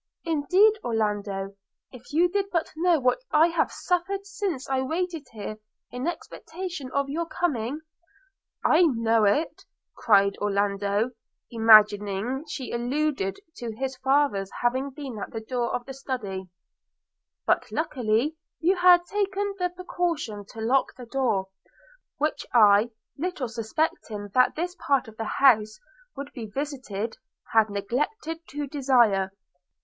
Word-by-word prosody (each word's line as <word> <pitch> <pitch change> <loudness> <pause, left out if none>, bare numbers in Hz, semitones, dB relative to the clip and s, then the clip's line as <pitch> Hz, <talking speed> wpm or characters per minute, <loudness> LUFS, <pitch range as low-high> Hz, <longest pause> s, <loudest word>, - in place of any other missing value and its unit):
– - - -42
Indeed, 390 +9 +4
Orlando, 205 -4 -1 0.4
if 245 -2 -13
you 335 +4 +4
did 395 +2 -1
but 335 -2 -1
know 340 0 +3
what 250 - +2
I 320 +2 +5
have 335 - 0
suffered 385 +2 -1
since 390 -8 -3
I 265 -1 0
waited 325 +1 -3
here 215 -1 -6 0.3
in 250 +5 -4
expectation 345 -3 -6
of 280 0 0
your 330 +4 -2
coming!' 295 -4 -2 0.4
– 390 0 -24
'I 315 - +5
know 225 -1 +3
it,' 290 +11 +1 0.3
cried 200 -3 +3
Orlando, 200 +2 0 0.4
imagining 215 +2 +4
she 270 -4 -5
alluded 245 -5 -1 0.2
to 235 -3 -5
his 265 +2 -3
father's 265 -7 +1
having 260 +3 +1
been 265 -5 -7
at - - -5
the 225 - -5
door 240 +1 -2
of 245 - -4
the 270 - -7
Study 215 -9 -5 0.5
– - - -62
'But - - +1
luckily 250 +5 0 0.2
you 365 +3 +2
had 355 -1 +6
taken 405 0 -1
the 360 0 +1
precaution 340 - -3
to 220 - -9
lock 255 +4 +1
the 250 - -10
door; 235 -6 0 0.7
which 305 +2 -1
I, 210 0 +6 0.3
little 345 -6 -2
suspecting 220 -3 -3
that 255 0 +4
this 355 +3 -3
part 275 -4 +1
of 220 0 -13
the 225 - -3
house 215 -5 +4 0.4
would 280 +1 -6
be 230 -4 -6
visited, 230 -4 -4 0.4
had 220 -1 +5
neglected 295 - -2
to 290 +1 -4
desire. 245 -9 +3
260 Hz, 140 wpm, -26 LUFS, 220-320 Hz, 0.7 s, had